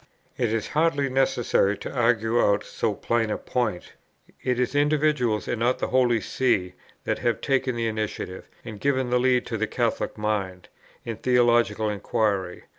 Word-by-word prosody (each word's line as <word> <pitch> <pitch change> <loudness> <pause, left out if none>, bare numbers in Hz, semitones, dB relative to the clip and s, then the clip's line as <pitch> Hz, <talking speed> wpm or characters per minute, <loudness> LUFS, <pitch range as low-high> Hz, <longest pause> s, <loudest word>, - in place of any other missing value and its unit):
It 120 -4 0
is 115 -1 -2
hardly 150 -3 +1
necessary 120 -6 +1
to - - -7
argue 115 -1 +2
out 100 - +2
so - - -2
plain 115 -2 0
a - - -1
point. 110 -8 -3 0.5
It 125 -1 -1
is 125 +1 0
individuals, 145 -6 +1
and 120 - -2
not 120 +2 +2
the - - -3
Holy 125 -3 +3
See, 100 -8 0 0.3
that - - -1
have 120 -2 0
taken 135 -3 0
the 115 -1 -1
initiative, 110 -4 -4 0.2
and 110 -3 -8
given 130 -2 0
the 125 - +3
lead 125 0 +2
to 115 - -3
the 110 0 -1
Catholic 120 -1 -2
mind, 100 -4 -3 0.4
in 115 -2 -4
theological 120 -3 +2
inquiry. 100 -3 -1
120 Hz, 165 wpm, -25 LUFS, 105-130 Hz, 0.5 s, Holy